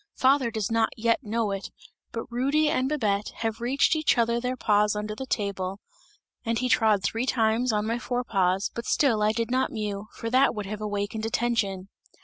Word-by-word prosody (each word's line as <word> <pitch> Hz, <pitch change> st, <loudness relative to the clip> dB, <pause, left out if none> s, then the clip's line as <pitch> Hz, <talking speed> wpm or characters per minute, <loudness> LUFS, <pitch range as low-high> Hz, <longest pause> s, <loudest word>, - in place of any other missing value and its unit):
Father 265 Hz, -1 st, +3 dB
does 220 Hz, -1 st, -3 dB
not 225 Hz, -1 st, +2 dB
yet 230 Hz, +1 st, +2 dB
know 220 Hz, 0 st, -1 dB
it, 195 Hz, 0 st, -4 dB, 0.4 s
but 230 Hz, -, -4 dB
Rudy 280 Hz, +5 st, +2 dB
and 265 Hz, -4 st, 0 dB
Babette 210 Hz, -9 st, 0 dB
have 225 Hz, 0 st, -2 dB
reached 270 Hz, +6 st, +2 dB
each 310 Hz, -4 st, +2 dB
other 235 Hz, 0 st, +2 dB
their 250 Hz, +1 st, -2 dB
paws 210 Hz, -2 st, +2 dB
under 210 Hz, 0 st, -3 dB
the 265 Hz, +5 st, -7 dB
table, 195 Hz, -4 st, -2 dB, 0.6 s
and 230 Hz, -1 st, -1 dB
he 255 Hz, -, 0 dB
trod 215 Hz, -5 st, +3 dB
three 230 Hz, +6 st, -1 dB
times 230 Hz, 0 st, +2 dB
on 210 Hz, 0 st, 0 dB
my 230 Hz, +2 st, -1 dB
fore 245 Hz, 0 st, -2 dB
paws, 195 Hz, -4 st, +1 dB
but 235 Hz, -, -6 dB
still 235 Hz, -7 st, +2 dB
I 210 Hz, 0 st, +3 dB
did 230 Hz, +1 st, -2 dB
not 260 Hz, +1 st, +1 dB
mew, 210 Hz, -1 st, -4 dB
for 230 Hz, -, -5 dB
that 260 Hz, 0 st, +4 dB
would 210 Hz, -1 st, -4 dB
have 210 Hz, +2 st, -6 dB
awakened 210 Hz, +1 st, -2 dB
attention!" 205 Hz, -5 st, -1 dB
225 Hz, 195 wpm, -26 LUFS, 210-245 Hz, 0.6 s, that